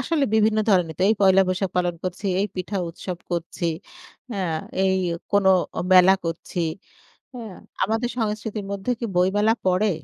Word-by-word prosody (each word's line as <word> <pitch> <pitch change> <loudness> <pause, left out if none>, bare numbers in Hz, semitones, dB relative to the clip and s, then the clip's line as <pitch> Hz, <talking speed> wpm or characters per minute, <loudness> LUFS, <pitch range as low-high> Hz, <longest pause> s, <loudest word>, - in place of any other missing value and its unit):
আসলে 290 +3 +1
বিভিন্ন 220 0 +3
ধরনের 175 -4 +2
তো - - 0
এই 220 - +4
পয়লা 190 0 +6
বৈশাখ 185 0 -1
পালন 175 -1 +1
করছি, 185 +2 -4
এই 200 - +1
পিঠা 190 +2 -3
উৎসব 175 +1 -6
করছি 170 0 -3 0.7
হ্যাঁ, 180 -6 -2 0.3
এই 190 0 +2 0.4
কোনো 200 -1 +4 0.4
মেলা 185 +1 +7
করছি 165 +1 -4 0.7
হ্যাঁ? 225 -6 -8 0.3
আমাদের 225 +4 -1
সংস্কৃতির 215 -2 -3
মধ্যে 200 +4 -3
কি - - -3
বইমেলা 205 +5 +3
পড়ে? 185 +3 +3
195 Hz, 150 wpm, -23 LUFS, 180-215 Hz, 0.7 s, মেলা